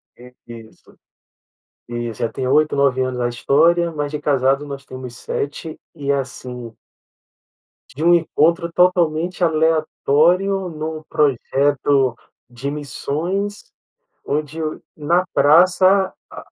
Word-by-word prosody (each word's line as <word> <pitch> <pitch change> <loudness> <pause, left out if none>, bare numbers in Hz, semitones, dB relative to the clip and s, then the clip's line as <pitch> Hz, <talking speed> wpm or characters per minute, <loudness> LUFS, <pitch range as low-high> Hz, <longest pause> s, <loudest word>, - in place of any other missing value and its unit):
É 125 +1 -15 0.2
isso, 115 -2 -14 0.9
isso 120 -2 -5
já 115 - 0
tem 130 - -4
8, 150 +3 +2
9 140 -2 +2
anos 130 -1 -2
na 120 0 0
história, 165 +8 +2
mas 145 -2 -4
de 150 - -3
casado 135 -1 +1
nós 140 -1 -7
temos 130 -2 -9
7, 145 +6 -5 0.2
e 140 -3 -2
assim 125 -4 -5 1.2
de 150 - -4
um 175 +1 +5
encontro 170 +1 +2
totalmente 175 0 +1
aleatório 165 +4 +2
num 155 0 -6
projeto 140 -1 +1 0.3
de 125 +3 -5
missões, 165 +8 -4 0.6
onde 150 +2 -3
o 155 -1 -4
na 170 +4 +1
praça, 185 +5 +4 0.2
a - - -10
150 Hz, 115 wpm, -20 LUFS, 135-170 Hz, 1.2 s, um